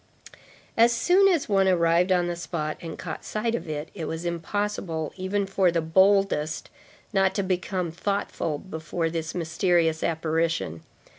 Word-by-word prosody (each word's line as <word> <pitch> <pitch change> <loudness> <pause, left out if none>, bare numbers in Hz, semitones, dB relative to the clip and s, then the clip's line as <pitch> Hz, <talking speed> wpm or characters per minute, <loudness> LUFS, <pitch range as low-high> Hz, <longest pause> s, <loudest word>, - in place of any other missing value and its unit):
As 230 +1 +6
soon 360 +11 +4
as 345 -7 +2
one 195 -3 +3
arrived 175 0 +3
on 180 -1 +3
the 175 0 -2
spot, 155 -2 -3
and 165 -2 -7
caught 160 -4 -6
sight 225 +2 -2
of 235 -8 -3
it, 150 +1 -4
it 165 -5 -5
was 160 +2 -4
impossible, 170 -2 -2
even 195 +2 -1
for 195 -1 +2
the 170 0 +1
boldest, 190 -2 +2 0.4
not 190 -1 +2
to 200 - 0
become 185 -1 -1
thoughtful 175 -3 -2
before 165 0 -3
this 160 -1 -4
mysterious 165 -1 +1
apparition. 160 - -1
175 Hz, 150 wpm, -26 LUFS, 160-195 Hz, 0.4 s, As